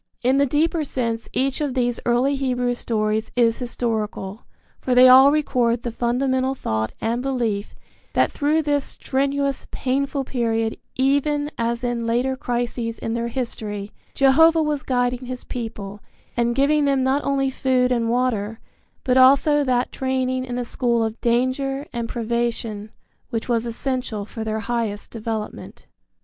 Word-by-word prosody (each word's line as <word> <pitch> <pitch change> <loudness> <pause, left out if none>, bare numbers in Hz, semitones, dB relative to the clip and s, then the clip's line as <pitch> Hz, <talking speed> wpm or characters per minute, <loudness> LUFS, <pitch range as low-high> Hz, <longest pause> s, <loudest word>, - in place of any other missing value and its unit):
In 260 +3 +3
the 280 - +3
deeper 315 +4 +1
sense 230 -5 -3
each 270 +3 0
of 280 -3 -1
these 245 -2 +1
early 250 +4 +2
Hebrew 250 -2 0
stories 220 -2 -1
is 230 -2 +3
historical, 220 -4 -3 0.3
for 255 - 0
they 250 +1 +8
all 265 +2 +8
record 245 -6 +1
the 240 - -3
fundamental 260 +3 0
thought 110 - -2
and 235 +2 -1
belief 235 -6 -2 0.4
that - - +2
through 305 +2 +1
this 290 -1 +1
strenuous, 275 +1 -1
painful 275 +1 -1
period, 225 -3 -1 0.2
even 290 +2 +1
as 235 +1 -2
in 240 -1 -1
later 250 +3 +1
crises 240 -2 -3
in 225 - -3
their 235 0 -1
history, 215 -4 -4 0.2
Jehovah 320 +4 +5
was 300 -2 -1
guiding 250 -2 -1
his 255 0 -6
people 210 -4 -6 0.4
and 235 0 +1
giving 290 +2 +3
them 275 -2 +2
not 270 +2 +1
only 270 -1 +1
food 255 -1 +1
and 230 -2 +1
water, 225 -3 0 0.4
but 255 0 +2
also 280 +3 +5
that 250 -2 0
training 260 -1 -1
in 245 -1 -5
the 245 0 -2
school 235 -1 +1
of 220 0 -4
danger 260 +4 0
and 235 -1 -3
privation 230 -2 -2 0.4
which 230 -3 -3
was 235 -1 0
essential 235 -3 -3
for 225 +1 -6
their 220 0 -2
highest 220 -2 -3
development. 220 -1 -6
245 Hz, 150 wpm, -22 LUFS, 230-270 Hz, 0.4 s, they